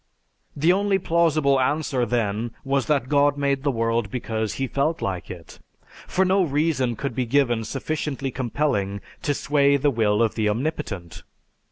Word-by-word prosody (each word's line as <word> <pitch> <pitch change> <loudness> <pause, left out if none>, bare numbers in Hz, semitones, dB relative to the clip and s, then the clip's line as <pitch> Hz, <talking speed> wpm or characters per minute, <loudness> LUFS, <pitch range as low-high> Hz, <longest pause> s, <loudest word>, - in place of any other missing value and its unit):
The 160 +5 +3
only 200 0 +2
plausible 160 -6 +2
answer 130 -2 0
then 110 0 -1
was 135 -1 0
that 140 -5 +1
God 145 0 +3
made 140 -1 0
the 145 - 0
world 115 -3 0
because 110 -2 -3
He 135 - -2
felt 145 +5 -1
like 95 -3 -4
it. 85 -3 -10 0.5
For 190 - +1
no 190 +1 +3
reason 145 -6 +1
could 140 +3 -4
be 125 -2 -2
given 120 -3 +2
sufficiently 140 +1 -3
compelling 115 -6 -1 0.2
to 145 -5 0
sway 140 0 +3
the 145 +1 +2
will 110 -2 +2
of 115 - +1
the 110 -2 0
Omnipotent. 105 - -4
135 Hz, 160 wpm, -23 LUFS, 115-150 Hz, 0.5 s, The